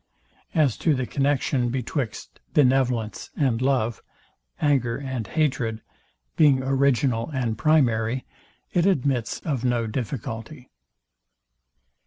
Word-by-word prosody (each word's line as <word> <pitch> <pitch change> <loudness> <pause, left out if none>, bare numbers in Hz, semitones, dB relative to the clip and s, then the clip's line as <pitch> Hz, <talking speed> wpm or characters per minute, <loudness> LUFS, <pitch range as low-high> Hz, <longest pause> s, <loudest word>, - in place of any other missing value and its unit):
As 150 -8 +3
to 155 -3 +2
the 130 -1 -1
connexion 135 -2 0
betwixt 125 -2 -4 0.2
benevolence 125 -5 +2
and 125 -5 +1
love, 125 -4 +1 0.6
anger 130 -5 +1
and 130 -6 -4
hatred, 125 -6 -1 0.5
being 140 -4 +4
original 135 -3 +1
and 125 -6 -1
primary, 125 -4 +2 0.5
it 175 +1 +3
admits 135 - 0
of 135 -6 -2
no 120 -2 +1
difficulty. 120 +3 -5
130 Hz, 100 wpm, -24 LUFS, 115-140 Hz, 0.6 s, being